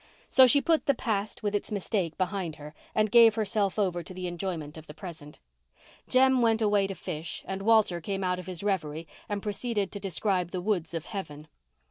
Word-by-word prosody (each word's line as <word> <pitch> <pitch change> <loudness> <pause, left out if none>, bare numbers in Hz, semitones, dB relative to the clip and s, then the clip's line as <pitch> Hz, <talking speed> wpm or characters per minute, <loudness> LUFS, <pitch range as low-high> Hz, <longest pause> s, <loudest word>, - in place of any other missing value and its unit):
So 260 -1 +8
she 285 +3 +5
put 325 0 +1
the 280 - +4
past 215 -4 -2
with 205 -1 -1
its 205 - -2
mistake 190 -5 -2
behind 185 -3 -2
her 150 0 -10 0.2
and 215 -1 +2
gave 230 -2 +7
herself 210 -3 0
over 185 -4 0
to 185 +2 -7
enjoyment 175 -4 -4
of 160 -1 -11
the 150 - -10
present. 155 -5 -10 0.7
Jem 260 0 +4
went 225 -1 +3
away 205 -3 +2
to 195 - -5
fish 160 0 -6
and 190 0 -4
Walter 210 -5 +3
came 195 +3 -3
out 180 0 0
of 180 - -9
his 185 -1 -5
reverie 165 -5 -2 0.2
and 205 -1 -3
proceeded 210 0 -2
to 200 - -5
describe 190 -1 -1
the 185 - -4
woods 175 -4 -1
of 165 - -4
heaven. 155 -7 -7
195 Hz, 195 wpm, -28 LUFS, 170-215 Hz, 0.7 s, So